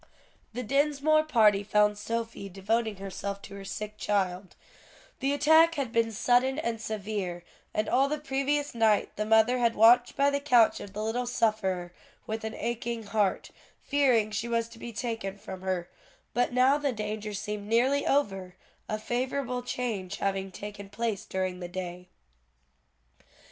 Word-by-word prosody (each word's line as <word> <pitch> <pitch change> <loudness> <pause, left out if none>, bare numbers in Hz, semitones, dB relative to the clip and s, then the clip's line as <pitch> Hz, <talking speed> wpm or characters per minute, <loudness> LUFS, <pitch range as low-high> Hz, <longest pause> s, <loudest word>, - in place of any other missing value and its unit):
The 250 +2 -4
Dinsmore 290 +4 +3
party 215 -8 +4
found 210 0 +3
Sophie 225 -1 -4
devoting 215 +4 -1
herself 195 +1 -5
to 195 - -10
her 200 0 -8
sick 210 +2 -6
child; 190 -2 -1 0.6
the 275 +1 0
attack 315 +3 +5
had 275 -6 -2
been 230 -1 +1
sudden 245 +5 +2
and 235 -7 -2
severe, 200 -5 -4 0.3
and 215 - -1
all 270 +2 +3
the 300 - -1
previous 290 0 -1
night 220 -3 +2
the 210 0 -2
mother 220 +3 +4
had 235 -1 +2
watched 240 +3 +6
by 280 +1 +4
the 280 - 0
couch 245 -6 +4
of 195 - -9
the 210 +1 -3
little 240 +3 -1
sufferer 190 -7 0 0.3
with 220 0 -4
an 220 0 -4
aching 235 0 -3
heart, 205 -2 0 0.3
fearing 255 -7 +2
she 220 +3 -2
was 230 -1 0
to 230 0 -14
be 235 - -7
taken 220 -3 -4
from 190 -2 -8
her; 185 -2 -2 0.5
but 245 +1 +1
now 255 +3 +4
the 285 -2 0
danger 210 -1 -4
seemed 210 0 -5
nearly 255 +6 +3
over, 195 -10 0 0.3
a 215 - -1
favorable 250 +2 -2
change 220 -6 -3
having 195 -1 -2
taken 200 +1 -8
place 220 -2 -3
during 185 -1 -3
the 175 - -5
day. 180 0 -6
220 Hz, 160 wpm, -28 LUFS, 200-250 Hz, 0.6 s, watched